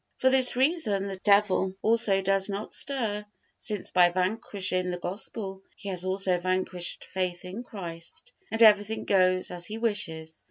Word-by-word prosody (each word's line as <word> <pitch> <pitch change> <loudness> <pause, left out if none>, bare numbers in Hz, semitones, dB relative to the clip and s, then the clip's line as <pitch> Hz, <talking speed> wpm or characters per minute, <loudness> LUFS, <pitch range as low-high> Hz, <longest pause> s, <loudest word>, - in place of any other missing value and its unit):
For 260 - +2
this 260 -2 +6
reason 250 - +1
the 195 - -4
devil 200 -1 +2
also 220 -4 +4
does 195 +1 +2
not 200 +2 -5
stir, 225 -7 -1 0.4
since 210 -3 -3
by 180 -1 +5
vanquishing 185 -1 -1
the 180 - -3
Gospel 190 +2 -5
he 200 - -8
has 185 -1 -2
also 185 -1 +2
vanquished 185 -1 -2
faith 180 -2 -4
in 190 +6 -7
Christ, 205 - -7 0.2
and 225 +1 +2
everything 210 0 +4
goes 185 -2 +2
as 175 -1 -2
he 215 - -6
wishes. 160 -8 -2
195 Hz, 155 wpm, -27 LUFS, 185-220 Hz, 0.4 s, this